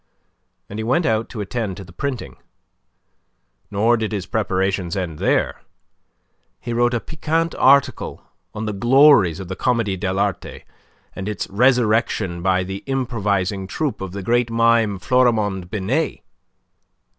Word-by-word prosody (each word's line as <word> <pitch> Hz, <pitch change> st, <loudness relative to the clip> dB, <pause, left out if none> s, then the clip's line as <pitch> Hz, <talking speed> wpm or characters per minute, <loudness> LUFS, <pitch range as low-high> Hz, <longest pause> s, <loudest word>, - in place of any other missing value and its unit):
And 105 Hz, -, -7 dB
he -, -, -2 dB
went 130 Hz, +9 st, +1 dB
out 110 Hz, 0 st, 0 dB
to 110 Hz, -, -6 dB
attend 105 Hz, -2 st, -3 dB
to 100 Hz, -, -8 dB
the 90 Hz, -2 st, -15 dB
printing. 135 Hz, +3 st, -5 dB, 1.3 s
Nor 110 Hz, +4 st, +2 dB
did 110 Hz, -1 st, -3 dB
his 100 Hz, -3 st, -3 dB
preparations 95 Hz, -4 st, -1 dB
end 85 Hz, -5 st, -4 dB
there. -, -, 0 dB, 1.0 s
He 120 Hz, -, -5 dB
wrote 120 Hz, +1 st, +2 dB
a -, -, +1 dB
piquant 160 Hz, +4 st, -2 dB
article 140 Hz, +1 st, +2 dB, 0.3 s
on 110 Hz, +1 st, -4 dB
the 105 Hz, -, -2 dB
glories 120 Hz, -, +5 dB
of 95 Hz, -, -7 dB
the 95 Hz, -, -5 dB
Comedie 115 Hz, -5 st, 0 dB
de 95 Hz, 0 st, -2 dB
l'Art, 100 Hz, -1 st, -1 dB, 0.7 s
and 95 Hz, +2 st, -4 dB
its 105 Hz, -, -4 dB
resurrection 110 Hz, -5 st, +2 dB
by 95 Hz, 0 st, +2 dB
the 95 Hz, +2 st, -6 dB
improvising 100 Hz, -7 st, -1 dB
troupe 145 Hz, +6 st, -3 dB
of 95 Hz, -2 st, -5 dB
the 100 Hz, +1 st, -6 dB
great 120 Hz, +3 st, +1 dB
mime 115 Hz, -3 st, +2 dB
Florimond 105 Hz, -5 st, +1 dB
Binet. 110 Hz, -, -1 dB
110 Hz, 145 wpm, -21 LUFS, 95-120 Hz, 1.3 s, glories